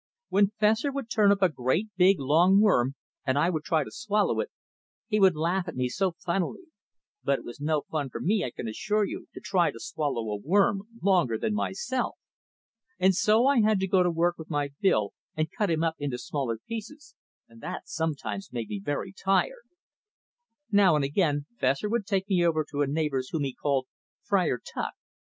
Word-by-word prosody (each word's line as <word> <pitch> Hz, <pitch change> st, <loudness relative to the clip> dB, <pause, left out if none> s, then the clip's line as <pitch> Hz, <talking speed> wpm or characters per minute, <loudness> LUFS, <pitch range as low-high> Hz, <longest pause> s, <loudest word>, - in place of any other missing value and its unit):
When 200 Hz, 0 st, +4 dB
Fessor 220 Hz, +6 st, +3 dB
would 270 Hz, -4 st, -5 dB
turn 210 Hz, -3 st, +5 dB
up 200 Hz, -1 st, +2 dB
a 185 Hz, -, +5 dB
great, 155 Hz, -, -1 dB
big, 190 Hz, +1 st, +5 dB
long 165 Hz, +8 st, +4 dB
worm 140 Hz, -, +3 dB, 0.3 s
and 130 Hz, 0 st, 0 dB
I 165 Hz, +5 st, +3 dB
would 155 Hz, -3 st, -2 dB
try 160 Hz, -3 st, +1 dB
to -, -, -10 dB
swallow 210 Hz, -1 st, 0 dB
it, -, -, -1 dB, 0.6 s
he 215 Hz, -2 st, 0 dB
would 190 Hz, -4 st, +5 dB
laugh 175 Hz, +4 st, 0 dB
at 165 Hz, -, -6 dB
me 125 Hz, 0 st, 0 dB
so 185 Hz, +5 st, 0 dB
funnily. 175 Hz, -, -2 dB, 0.6 s
But 140 Hz, -, +2 dB
it -, -, -12 dB
was 120 Hz, -, -9 dB
no 150 Hz, 0 st, 0 dB
fun 145 Hz, -4 st, -3 dB
to -, -, -4 dB
me, 205 Hz, +1 st, +1 dB
I -, -, -2 dB
can 115 Hz, -, -7 dB
assure 210 Hz, -, 0 dB
you, -, -, -7 dB
to -, -, -6 dB
try 180 Hz, -4 st, +2 dB
to 115 Hz, -, -8 dB
swallow 120 Hz, -6 st, -2 dB
a 105 Hz, -, -2 dB
worm 195 Hz, -, +2 dB, 0.2 s
longer 175 Hz, -, +3 dB
than 215 Hz, -, -1 dB
myself. 475 Hz, -, -2 dB, 0.8 s
And 190 Hz, +1 st, +4 dB
so 215 Hz, +6 st, +3 dB
I 275 Hz, -3 st, +4 dB
had 215 Hz, -2 st, +3 dB
to 190 Hz, -, 0 dB
go 185 Hz, 0 st, +3 dB
to 180 Hz, -, +3 dB
work 170 Hz, +1 st, 0 dB
with 160 Hz, -, -9 dB
my 145 Hz, -2 st, -1 dB
bill 110 Hz, -, +2 dB, 0.2 s
and 155 Hz, 0 st, -1 dB
cut 210 Hz, -3 st, 0 dB
him 160 Hz, -1 st, +1 dB
up 165 Hz, -1 st, 0 dB
into 140 Hz, -4 st, -2 dB
smaller 125 Hz, -2 st, -3 dB
pieces, 230 Hz, +7 st, -7 dB, 0.3 s
and 115 Hz, 0 st, -17 dB
that 180 Hz, +7 st, -6 dB
sometimes 140 Hz, -11 st, -3 dB
made 115 Hz, -3 st, -4 dB
me 100 Hz, -2 st, -4 dB
very 145 Hz, -, -3 dB
tired. 340 Hz, -, 0 dB, 1.0 s
Now 200 Hz, -5 st, +5 dB
and 145 Hz, -2 st, +1 dB
again 145 Hz, -1 st, +1 dB
Fessor 135 Hz, +10 st, +1 dB
would 220 Hz, -3 st, -1 dB
take 195 Hz, -2 st, 0 dB
me 185 Hz, -3 st, +2 dB
over 155 Hz, -2 st, +2 dB
to 145 Hz, -, -1 dB
a 145 Hz, -, +2 dB
neighbor's 140 Hz, -3 st, -1 dB
whom 155 Hz, -3 st, -1 dB
he 135 Hz, -2 st, -2 dB
called 135 Hz, -2 st, 0 dB, 0.4 s
"Friar 185 Hz, -10 st, +1 dB
Tuck." -, -, -4 dB
170 Hz, 200 wpm, -27 LUFS, 140-200 Hz, 1.0 s, turn